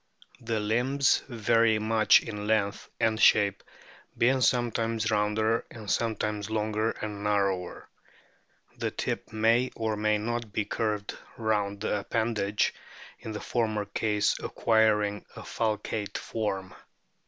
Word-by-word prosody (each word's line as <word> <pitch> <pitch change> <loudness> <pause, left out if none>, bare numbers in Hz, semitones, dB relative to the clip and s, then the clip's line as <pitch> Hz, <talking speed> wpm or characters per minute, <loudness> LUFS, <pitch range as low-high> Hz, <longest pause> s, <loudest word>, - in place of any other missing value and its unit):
The 115 -1 -2
limbs 125 +6 +2
vary 115 -1 +3
much 110 0 +4
in 105 0 -5
length 105 -2 0
and 110 0 +1
shape, 100 -2 +4 0.6
being 130 +2 +3
sometimes 115 -2 +1
rounder 110 +2 +1
and 110 -3 -6
sometimes 105 -2 -1
longer 110 0 0
and 105 -1 -5
narrower. 100 -3 -1 0.9
The - - 0
tip - - -4
may 115 +3 +2
or 110 -1 -1
may 105 0 +1
not 115 +1 -3
be 105 0 -1
curved 105 -2 -2 0.2
round 105 -3 -1
the 105 -1 0
appendage, 105 -1 0 0.5
in 110 - -7
the 105 - -5
former 110 -3 -1
case 105 0 0
acquiring 105 -2 +2
a - - -8
falcate 105 -1 -2
form. 95 -4 -3
110 Hz, 120 wpm, -28 LUFS, 105-115 Hz, 0.9 s, much